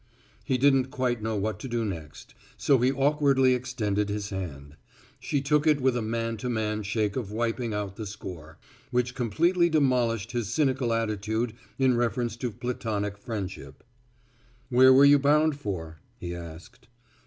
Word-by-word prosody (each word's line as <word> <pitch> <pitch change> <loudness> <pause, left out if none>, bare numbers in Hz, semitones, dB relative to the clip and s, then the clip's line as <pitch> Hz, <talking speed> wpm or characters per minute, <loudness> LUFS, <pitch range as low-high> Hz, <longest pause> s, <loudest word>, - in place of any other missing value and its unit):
He 130 - 0
didn't 135 -1 +4
quite 130 -4 -1
know 110 0 -2
what 105 -1 -2
to - - -6
do 120 -2 -1
next, 80 -6 -7 0.2
so 135 -3 +3
he 125 +2 +3
awkwardly 140 -2 +3
extended 110 -5 -1
his 105 0 -3
hand. 75 -7 -6 0.4
She 140 - -1
took 150 +2 +2
it 150 -2 +4
with 130 -1 +2
a 120 - 0
man 115 +1 -2
to 125 +4 -4
man 110 -2 -1
shake 105 0 -1
of 115 -6 -4
wiping 115 +1 -1
out 105 -2 -4
the 110 -2 -5
score, 90 -6 -9 0.3
which 125 -1 0
completely 170 - +2
demolished 125 - +1
his 120 -5 -2
cynical 135 -5 +1
attitude 110 0 -1 0.2
in 130 -2 +3
reference 120 -1 -1
to 125 0 -2
platonic 110 -4 -3
friendship. 100 -4 -6 0.9
"Where 130 +1 +7
were 135 +2 +7
you 145 0 +7
bound 150 +1 +3
for?" 80 - -5 0.2
he 85 0 -5
asked. 85 -1 -10
115 Hz, 160 wpm, -27 LUFS, 105-130 Hz, 0.9 s, Where